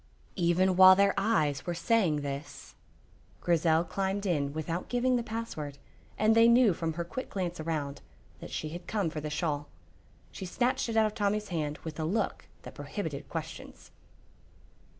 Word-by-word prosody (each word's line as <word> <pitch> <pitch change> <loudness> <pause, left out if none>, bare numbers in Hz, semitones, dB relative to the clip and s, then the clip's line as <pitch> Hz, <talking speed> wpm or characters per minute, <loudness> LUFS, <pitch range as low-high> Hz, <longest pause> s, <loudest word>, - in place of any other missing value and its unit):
Even 180 +2 +2
while 185 0 +10
their 200 +1 +4
eyes 195 -10 +1
were 175 - -1
saying 180 -6 +2
this, 140 0 -6 0.7
Grizel 165 -1 +2
climbed 195 +3 -2
in 145 -7 0
without 160 +3 -4
giving 250 +1 +2
the 240 - +1
password, 220 -11 -5 0.4
and 215 +1 +4
they 230 0 +7
knew 235 -4 +6
from 165 -1 -3
her 170 +2 -3
quick 255 +10 -6
glance 180 -3 -3
around 150 -3 -3 0.4
that - - -9
she 155 - -4
had 175 +3 -8
come 200 -7 -1
for 155 - -5
the 150 - -4
shawl. 150 -2 -2 0.6
She 190 - -7
snatched 250 +6 0
it 225 - -1
out 220 - +5
of 215 - -1
Tommy's 210 0 -1
hand 155 -4 -2
with 160 -1 -7
a - - -1
look 210 +7 -1 0.2
that - - -9
prohibited - - -5
questions. - - -7
175 Hz, 170 wpm, -30 LUFS, 155-215 Hz, 0.7 s, while